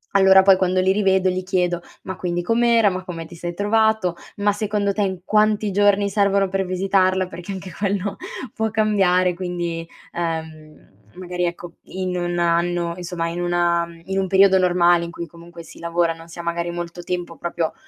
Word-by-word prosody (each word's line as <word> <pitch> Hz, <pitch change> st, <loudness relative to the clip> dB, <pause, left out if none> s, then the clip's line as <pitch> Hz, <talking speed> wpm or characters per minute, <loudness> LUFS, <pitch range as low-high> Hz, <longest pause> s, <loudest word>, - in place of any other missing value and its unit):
allora 190 Hz, -1 st, +7 dB
poi 195 Hz, -1 st, +6 dB
quando 185 Hz, 0 st, +1 dB
li 190 Hz, +1 st, +3 dB
rivedo 190 Hz, -2 st, +2 dB
gli 185 Hz, 0 st, -2 dB
chiedo: 180 Hz, -2 st, 0 dB, 0.2 s
"Ma 190 Hz, -, -6 dB
quindi 175 Hz, -1 st, -2 dB
com'era, 230 Hz, 0 st, +3 dB
ma 185 Hz, -1 st, -4 dB
come 165 Hz, -3 st, -6 dB
ti 175 Hz, -, -12 dB
sei 175 Hz, +1 st, -5 dB
trovato, 210 Hz, -1 st, +1 dB, 0.2 s
ma 205 Hz, 0 st, +2 dB
secondo 205 Hz, -1 st, -1 dB
te 210 Hz, -, -2 dB
in 190 Hz, -2 st, -3 dB
quanti 215 Hz, 0 st, +2 dB
giorni 205 Hz, 0 st, +3 dB
servono 200 Hz, -1 st, +2 dB
per 195 Hz, 0 st, -1 dB
visitarla", 185 Hz, 0 st, +1 dB
perché 180 Hz, +2 st, -7 dB
anche 190 Hz, -1 st, -7 dB
quello 200 Hz, +1 st, -2 dB, 0.4 s
può 220 Hz, -1 st, -1 dB
cambiare 195 Hz, -4 st, +2 dB
quindi, 175 Hz, -2 st, -4 dB, 0.3 s
ehm, 160 Hz, -2 st, -5 dB, 0.3 s
magari 180 Hz, -1 st, -3 dB
ecco 170 Hz, 0 st, -5 dB
in 185 Hz, -1 st, -4 dB
1 175 Hz, 0 st, -2 dB
anno 170 Hz, 0 st, +1 dB
insomma 175 Hz, -2 st, -3 dB
in 170 Hz, +1 st, -4 dB
una 175 Hz, -1 st, +1 dB, 0.2 s
in 190 Hz, 0 st, -3 dB
un 190 Hz, -, 0 dB
periodo 190 Hz, 0 st, +5 dB
normale 175 Hz, -1 st, +3 dB
in 170 Hz, -, -7 dB
cui 170 Hz, 0 st, -7 dB
comunque 170 Hz, +1 st, -13 dB
si 160 Hz, -, -14 dB
lavora, 170 Hz, 0 st, 0 dB
non 165 Hz, 0 st, -14 dB
si 165 Hz, -, -11 dB
ha -, -, -5 dB, 0.3 s
molto 175 Hz, 0 st, -6 dB
tempo 175 Hz, -1 st, -4 dB
proprio 170 Hz, -2 st, -2 dB
180 Hz, 180 wpm, -21 LUFS, 175-195 Hz, 0.4 s, allora